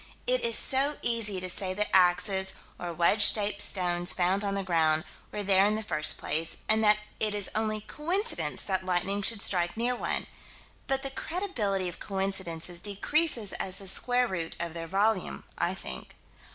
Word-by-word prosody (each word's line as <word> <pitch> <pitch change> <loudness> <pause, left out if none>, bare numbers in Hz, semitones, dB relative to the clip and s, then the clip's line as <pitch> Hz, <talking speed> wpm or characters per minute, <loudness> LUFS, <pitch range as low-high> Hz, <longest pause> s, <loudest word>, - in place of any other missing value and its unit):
It - - +1
is 470 0 +5
so 275 +2 +4
easy 220 -5 +1
to 185 - -3
say 185 +1 -2
that 210 +1 -2
axes, 190 +1 +3 0.3
or 175 -1 -5
wedge 170 +5 +2
shaped 205 -1 -2
stones 175 -3 +2
found 185 +3 +1
on 200 -1 -2
the 195 - -2
ground, 160 -3 +1 0.3
were 210 - -4
there 195 -1 +4
in 210 - 0
the 220 - -3
first 155 -7 +2
place, 160 +1 -2
and 220 0 +2
that 210 0 +5 0.2
it 215 -1 +2
is 205 -2 -2
only 215 0 -2
coincidence 360 - -3
that 190 -2 -2
lightning 185 +2 -1
should 205 +1 0
strike 175 0 +1
near 245 +2 0
one - - -3 0.6
but 270 0 -1
the 275 - -5
credibility 235 - -2
of 175 - -7
coincidences 190 -3 -3
decreases 225 +2 +1
as 190 0 -1
the 195 - -2
square 245 +6 +3
root 170 -5 -4
of 170 -1 -4
their 165 -1 -6
volume, 195 +1 0
I - - -1
think. 65 0 -6
195 Hz, 180 wpm, -28 LUFS, 180-220 Hz, 0.6 s, is